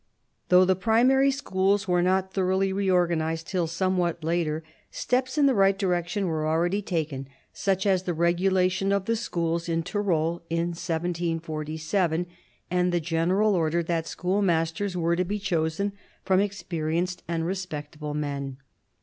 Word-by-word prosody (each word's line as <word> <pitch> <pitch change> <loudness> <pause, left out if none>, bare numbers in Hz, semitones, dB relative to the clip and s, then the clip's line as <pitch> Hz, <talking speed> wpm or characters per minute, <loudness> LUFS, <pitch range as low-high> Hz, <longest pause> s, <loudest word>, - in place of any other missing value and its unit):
Though 180 +1 +7
the 190 0 +3
primary 245 +7 +4
schools 200 -7 0
were 180 -1 +2
not 190 +1 +1
thoroughly 190 0 +1
reorganised 170 -4 +1
till 180 -2 -1
somewhat 175 -1 0
later, 160 -1 -1 0.3
steps 255 +2 -1
in 290 - +5
the 275 - +4
right 195 -2 +4
direction 180 +1 0
were 155 -3 -1
already 175 +5 +1
taken; 155 -8 -3 0.3
such 190 0 0
as 190 -3 +3
the 180 -2 -3
regulation 185 +3 +2
of 200 -1 +1
the 230 - +1
schools 170 -6 -2
in 165 0 0
Tyrol 170 -3 0
in 165 +1 0
1747, 165 0 -2 0.5
and 180 0 +2
the 175 - +1
general 175 +6 +1
order 170 -1 +1
that 165 -1 -1
schoolmasters 180 0 0
were 170 0 +1
to 180 - +1
be 200 +4 -2
chosen 175 0 -1 0.3
from 190 -1 +3
experienced 175 -3 -2
and 165 -1 -1
respectable 150 -5 -5
men. 140 -3 -3
175 Hz, 140 wpm, -26 LUFS, 165-195 Hz, 0.5 s, Though